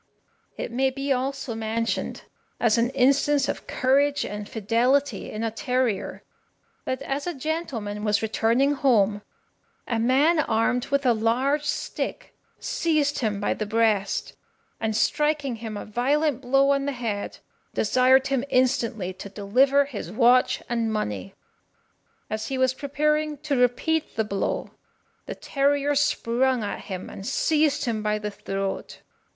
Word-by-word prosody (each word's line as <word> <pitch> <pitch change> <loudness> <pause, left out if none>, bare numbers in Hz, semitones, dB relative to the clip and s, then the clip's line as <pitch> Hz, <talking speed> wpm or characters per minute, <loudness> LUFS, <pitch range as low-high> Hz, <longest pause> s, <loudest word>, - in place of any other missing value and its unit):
It - - -4
may 265 +3 +2
be 275 +1 -1
also 265 -1 -3
mentioned 225 +1 -2 0.4
as 230 -1 +3
an 235 +1 +2
instance 275 +2 +3
of - - -4
courage 280 +2 +2
and 210 0 -6
fidelity 235 +3 +1
in 215 +1 -4
a 225 - -1
terrier, 250 -2 -1 0.6
that 260 +1 -3
as 280 +4 -3
a 350 - -2
gentleman 255 -9 -3
was 210 0 +1
returning 230 +6 +2
home, 220 -7 +2 0.7
a 230 -2 -1
man 275 +8 +3
armed 245 -1 +1
with 280 0 0
a 245 - +5
large 255 +7 +1
stick - - -4 0.3
seized 305 -3 0
him 215 -4 -1
by 205 - 0
the 215 - -4
breast, 215 -2 +1 0.5
and 220 -1 -1
striking 295 -1 +1
him 220 -2 -6
a - - -6
violent 270 +5 0
blow 270 +2 +3
on 275 0 +1
the 285 - -1
head, 225 -5 -4 0.4
desired 255 +4 +4
him 270 -2 0
instantly 235 -7 +1
to 190 +2 -9
deliver 255 +8 +3
his 210 - -7
watch 245 +3 +3
and 230 -2 -1
money. 105 - -3 0.9
As 215 0 -4
he 270 - -2
was 260 0 +2
preparing 300 +2 0
to 290 -2 +1
repeat 250 +6 +1
the 220 - +1
blow, 200 -2 -2 0.6
the - - -5
terrier 285 0 +1
sprung 260 -3 +1
at 205 - -5
him, 185 -3 -6
and 195 - -9
seized 295 +5 +1
him 225 -3 -1
by 210 0 0
the 210 0 -4
throat. 195 -1 -4
250 Hz, 145 wpm, -25 LUFS, 220-280 Hz, 0.9 s, a